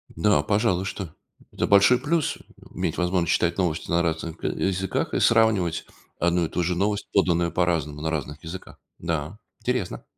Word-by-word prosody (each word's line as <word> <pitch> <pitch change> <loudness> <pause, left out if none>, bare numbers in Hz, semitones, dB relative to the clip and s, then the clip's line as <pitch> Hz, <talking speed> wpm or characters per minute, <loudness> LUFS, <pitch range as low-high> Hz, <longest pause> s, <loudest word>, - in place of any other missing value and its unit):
Да, 100 +6 +3
пожалуй, 105 -4 +1
что 95 -4 -6 0.4
это - - -1
большой 100 +5 +6
плюс- 155 +3 0 0.4
иметь - - -2
возможность 90 -1 +1
читать 85 0 +1
новости 85 -4 -1
на 85 0 +3
разных 80 0 -2
к - - -24
языках 95 0 -1
и - - +1
сравнивать 110 -8 +3 0.3
одну 85 0 +2
и - - -5
ту 90 - -1
же 90 +1 0
новость, 100 +3 -1
поданную 85 -3 +2
по-разному, 80 -5 0
на 80 - -1
разных 75 -1 -4
языках. 90 +3 -9 0.2
Да, 85 +3 -3 0.2
интересно. 125 -7 -2
90 Hz, 165 wpm, -25 LUFS, 85-100 Hz, 0.4 s, большой